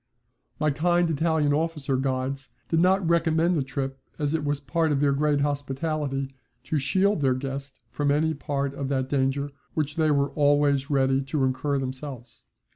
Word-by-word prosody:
My 155 -1 +2
kind 175 +4 +2
Italian 155 -1 +2
officer 150 -3 -1
guides 135 +1 -2 0.2
did 165 - +2
not 185 +1 +3
recommend 165 +1 +2
the 150 - +1
trip, 135 0 -4 0.2
as 145 -1 -1
it 160 -2 0
was 145 -1 -1
part 160 +3 0
of 140 - +1
their 145 0 +3
great 145 0 +1
hospitality 140 -1 -2 0.3
to 150 +3 -1
shield 190 +6 +2
their 130 -2 +3
guest 135 +1 -6
from 145 -1 -1
any 155 +3 +2
part 140 -2 -2
of 140 -1 -4
that 130 -1 -1
danger 140 +1 0 0.2
which 150 -1 -1
they 155 -1 +3
were 140 -1 +2
always 145 -1 +2
ready 135 -1 +2
to 140 0 -1
incur 135 +2 0
themselves. 130 -1 -6
145 Hz, 170 wpm, -26 LUFS, 135-155 Hz, 0.3 s, not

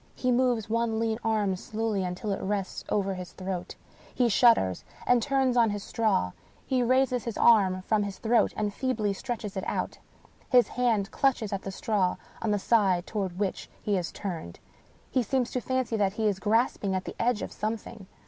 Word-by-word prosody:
He 255 - 0
moves 245 -3 +2
one 230 0 0
lean 225 0 0
arm 210 -4 +1
slowly 215 +1 -2
until 185 +4 -3
it 195 - -2
rests 195 -1 -2
over 195 -1 0
his 180 -3 -7
throat; 185 -1 -5 0.4
he 245 -2 +3
shudders, 210 - +4 0.2
and 245 -1 +4
turns 265 0 +1
on 235 -2 +5
his 205 -1 -3
straw; 210 - +1 0.3
he 260 -1 +1
raises 255 0 +2
his 230 -3 -4
arm 190 -5 +4
from 215 +1 +1
his 200 -2 -4
throat, 230 +1 +2
and 210 -1 -1
feebly 220 -6 -1
stretches 220 -2 -5
it 190 - -3
out; - - -3 0.5
his 250 -1 +5
hand 225 -5 +1
clutches 240 -7 +1
at 195 - -2
the 195 - -5
straw 190 -2 0 0.3
on 225 - -1
the 205 - +2
side 195 -4 +2
toward 190 -5 -3
which 195 -1 -2
he 210 - -2
has 180 -3 -1
turned; 165 - -6 0.5
he 260 - +2
seems 250 +1 0
to 250 - -2
fancy 260 -2 -1
that 195 -2 +1
he 220 +1 -2
is 200 -3 +1
grasping 210 -2 +1
at 185 0 -2
the - - -6
edge 235 -2 +1
of - - -5
something. 215 -1 -5
215 Hz, 190 wpm, -28 LUFS, 195-235 Hz, 0.5 s, on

